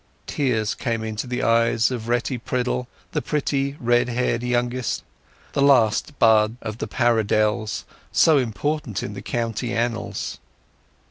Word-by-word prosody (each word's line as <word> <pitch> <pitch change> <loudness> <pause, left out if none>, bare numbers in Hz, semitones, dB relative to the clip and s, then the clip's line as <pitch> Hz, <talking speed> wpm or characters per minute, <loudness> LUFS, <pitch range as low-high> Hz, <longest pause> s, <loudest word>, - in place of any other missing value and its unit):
Tears 115 -7 0
came 115 -4 -2
into 110 +2 -4
the 125 0 -2
eyes 115 +1 +3
of 120 -3 -4
Retty 120 +1 0
Priddle, 125 +1 -2 0.2
the - - -1
pretty 140 -1 -1
red 120 +1 +2
haired 120 -1 0
youngest—the 125 +2 -3
last 135 0 +3
bud 110 -1 +4
of 110 0 -6
the - - -3
Paridelles, 110 -2 +1 0.3
so 155 -3 +5
important 130 - -2
in 100 - -5
the - - -7
county 115 0 -2
annals. 115 0 -2
120 Hz, 130 wpm, -23 LUFS, 110-125 Hz, 0.3 s, so